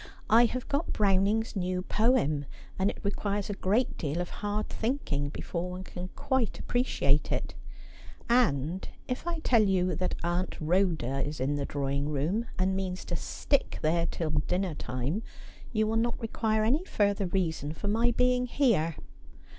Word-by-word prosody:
' - - -23
I - - +7
have 250 +2 -3
got 285 +4 -1
Browning's 205 +2 +2
new 180 -1 -1
poem, 185 - +2 0.3
and 190 +1 +3
it - - -5
requires 205 0 -1
a - - -1
great 205 +6 0
deal 150 +2 -1
of 175 - -3
hard 210 +1 -1
thinking 220 - -1
before 170 +4 -4
one 180 +1 -6
can 180 -1 -6
quite 265 -4 0
appreciate 150 - +1
it; - - -2 0.7
and 185 - +2 0.2
if 250 +6 -3
I 340 -1 0
tell 235 -3 +5
you 185 -3 +2
that 185 - -1
Aunt 175 +2 -1
Rhoda 160 -6 +1
is 150 0 -4
in 135 +3 +1
the 145 -1 -2
drawing 140 0 -1
room, 160 - 0
and 190 +1 +1
means 185 -1 -3
to 175 - -2
stick 280 - 0
there 165 +2 +2
till 160 -3 -2
dinner 175 +4 0
time, 135 - -2 0.5
you 215 -2 +2
will 220 +1 0
not 235 +1 0
require 220 -2 0
any 270 +10 +2
further 200 - +1
reason 160 -5 -1
for 185 +6 -5
my 225 +4 +3
being 250 +1 +2
here.' 205 - +2
190 Hz, 165 wpm, -29 LUFS, 160-225 Hz, 0.7 s, I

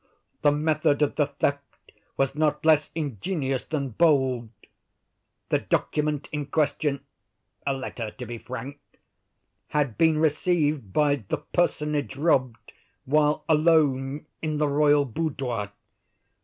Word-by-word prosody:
The 145 - +5
method 155 0 +1
of 145 - +1
the 150 - +1
theft 140 0 -3 0.3
was 135 -1 +1
not 150 +1 0
less 155 -2 +4
ingenious 140 - -2
than 140 -4 -2
bold. 130 -3 +2 1.0
The - - +2
document 150 -1 -1
in 150 -2 -3
question—a 140 -2 -3
letter, 130 -4 -4
to 125 +3 -9
be 120 0 -7
frank—had 135 +1 -7
been 160 -1 +4
received 155 - +1
by 145 +5 +3
the - - -1
personage 150 -5 -1
robbed 130 -6 0 0.3
while 150 +2 +2
alone 150 -3 +2 0.2
in 155 -1 -2
the 150 0 +2
royal 145 0 +3
boudoir. 125 -6 -3
145 Hz, 115 wpm, -26 LUFS, 135-155 Hz, 1.0 s, The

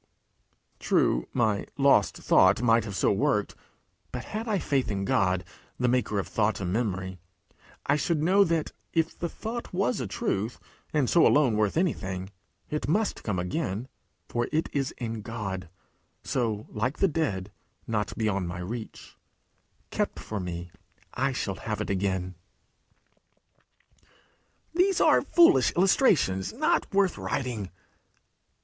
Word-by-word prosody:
True, - - +2
my 110 -5 +1
lost 135 -7 +4
thought 95 +5 +4
might 115 -2 +4
have 100 -3 -5
so - - +2
worked; 105 0 +1 0.6
but 125 0 -5
had 220 +2 -5
I 210 -2 +1
faith 140 -7 0
in 100 -2 -2
God, 95 -1 +2 0.4
the 125 - +2
maker 120 -4 +1
of 100 - -1
thought 110 0 0
and 90 -2 -2
memory, 95 -5 -2 0.7
I 140 - +3
should 160 +1 0
know 195 +4 +5
that, 165 -3 0 0.2
if 165 0 +1
the 170 - -3
thought 235 +6 -6
was 195 +6 0
a - - -3
truth, 115 - -2 0.3
and 145 -4 +2
so 170 - +5
alone 135 -7 +4
worth 105 +4 +1
anything, 95 - -1 0.4
it 150 - -3
must 210 +8 0
come 105 -4 -2
again; 100 - -2 0.4
for 120 0 -1
it 160 +2 0
is 135 -2 0
in 115 -2 -4
God 95 -5 -5 0.5
so, 110 -4 -1
like 120 +6 -2
the 195 - +4
dead, 105 - -2 0.3
not 105 -2 -2
beyond 100 -5 0
my 85 0 -5
reach: 110 +6 -7 0.8
kept - - -1
for 105 - -5
me, 90 -1 -5 0.4
I 135 +2 0
shall 105 -6 -2
have 105 -2 -4
it 105 - -2
again. 95 -1 -1 2.4
'These 365 +2 +3
are - - +5
foolish 345 +1 +5
illustrations 175 - +3
not 310 +8 +1
worth 195 -2 +2
writing!' 120 -8 -3
115 Hz, 140 wpm, -27 LUFS, 100-155 Hz, 2.4 s, know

